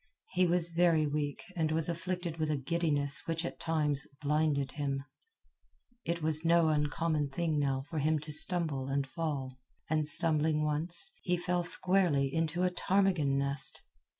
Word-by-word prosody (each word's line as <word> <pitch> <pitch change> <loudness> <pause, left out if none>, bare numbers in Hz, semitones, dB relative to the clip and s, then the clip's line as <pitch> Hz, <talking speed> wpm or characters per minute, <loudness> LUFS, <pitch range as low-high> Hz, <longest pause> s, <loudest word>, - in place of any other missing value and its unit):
He 185 -1 +2
was 170 0 +2
very 165 -2 +3
weak 145 -1 -3
and 160 -2 0
was 160 0 +1
afflicted 170 0 -3
with 155 -1 -1
a 150 - 0
giddiness 145 -1 0
which 165 +1 -2
at - - -6
times 150 -3 0
blinded 145 -2 0
him. 140 -2 -3 1.0
It 170 -1 -2
was 155 0 0
no 170 -1 +4
uncommon 150 0 0
thing 155 +1 -1
now 135 -2 0
for 155 +1 -3
him 155 +2 +2
to 150 0 -7
stumble 150 -3 +1
and 135 0 -1
fall; 135 -4 -4 0.3
and 155 -1 +1
stumbling 155 0 +2
once, 165 - -1
he 180 -1 0
fell 175 0 -1
squarely 175 -6 +2
into 165 +2 0
a 180 - +2
ptarmigan 180 -7 +1
nest. 140 0 -1
155 Hz, 155 wpm, -31 LUFS, 145-170 Hz, 1.0 s, no